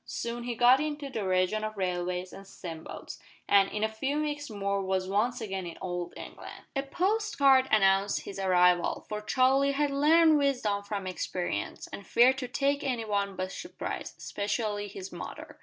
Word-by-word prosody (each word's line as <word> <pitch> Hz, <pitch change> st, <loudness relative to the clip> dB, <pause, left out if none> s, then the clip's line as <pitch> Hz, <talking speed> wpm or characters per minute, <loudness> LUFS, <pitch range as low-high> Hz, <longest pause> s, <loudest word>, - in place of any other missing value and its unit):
Soon 235 Hz, 0 st, -4 dB
he 245 Hz, -1 st, -3 dB
got 245 Hz, +3 st, +6 dB
into 295 Hz, -2 st, -3 dB
the 210 Hz, -6 st, -3 dB
region 185 Hz, +3 st, +1 dB
of 215 Hz, -1 st, -4 dB
railways 180 Hz, -1 st, -2 dB
and 195 Hz, -, -11 dB
steam 165 Hz, -4 st, -8 dB
boats, -, -, -9 dB, 0.3 s
and, 195 Hz, -1 st, +5 dB
in 210 Hz, -, -2 dB
a -, -, +4 dB
few 265 Hz, +7 st, -2 dB
weeks 295 Hz, -2 st, -3 dB
more 200 Hz, -2 st, -1 dB
was 190 Hz, -1 st, -1 dB
once 220 Hz, +6 st, 0 dB
again 190 Hz, -4 st, -4 dB
in 170 Hz, -, -8 dB
Old 175 Hz, -1 st, -4 dB
England. -, -, -10 dB
A 275 Hz, -, +1 dB
post 410 Hz, +9 st, -1 dB
card 265 Hz, -2 st, +5 dB
announced 195 Hz, -1 st, +3 dB
his 195 Hz, -, -8 dB
arrival, 180 Hz, -2 st, +3 dB
for 210 Hz, 0 st, -4 dB
Charlie 265 Hz, +5 st, +3 dB
had 290 Hz, 0 st, +1 dB
learned 310 Hz, +2 st, +5 dB
wisdom 245 Hz, -8 st, +1 dB
from 200 Hz, -1 st, -4 dB
experience, 180 Hz, -, -3 dB
and 200 Hz, -, -8 dB
feared 255 Hz, +3 st, +5 dB
to 255 Hz, -, -4 dB
take 280 Hz, +2 st, 0 dB
any 245 Hz, -4 st, -1 dB
one 200 Hz, -2 st, -1 dB
"by 185 Hz, -, -2 dB
surprise" 185 Hz, -, -6 dB
especially 205 Hz, 0 st, -2 dB
his 195 Hz, -1 st, -8 dB
mother. -, -, -8 dB
215 Hz, 180 wpm, -29 LUFS, 195-270 Hz, 0.3 s, got